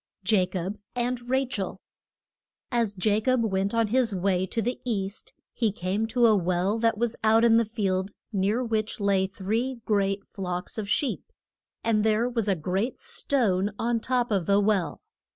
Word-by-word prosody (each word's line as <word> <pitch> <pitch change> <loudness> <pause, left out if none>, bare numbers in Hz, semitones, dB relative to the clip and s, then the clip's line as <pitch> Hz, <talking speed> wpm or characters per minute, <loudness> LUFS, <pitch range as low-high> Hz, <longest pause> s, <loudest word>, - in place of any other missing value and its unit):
JACOB 190 -1 0 0.2
AND 245 0 -2
RACHEL. 250 -8 -1 0.9
AS 230 -4 0
Ja 210 0 +4
cob 255 +1 +2
went 195 0 0
on 230 -2 +2
his 235 -3 +2
way 185 0 +1
to 230 - -3
the 240 +3 -2
East 200 -4 -3 0.2
he 225 -3 +1
came 195 +3 -2
to 240 +1 +3
a 220 -2 +6
well 185 +3 0
that 225 -1 +2
was 235 0 0
out 220 +1 +5
in 230 -1 +6
the 230 - +3
field, 195 -4 -1 0.2
near 205 +5 +1
which 220 -2 -1
lay 195 -2 +2
three 220 +7 -2
great 200 -1 0
flocks 180 +1 -4
of 200 -2 -4
sheep. 275 +5 0 0.5
And 220 -2 +2
there 220 +2 +2
was 235 -4 -1
a 195 - +3
great 190 +9 -2
stone 205 -8 +1
on 235 0 0
top 245 0 0
of 190 -5 0
the 200 0 +4
well. 195 -7 0
215 Hz, 170 wpm, -26 LUFS, 195-230 Hz, 0.9 s, a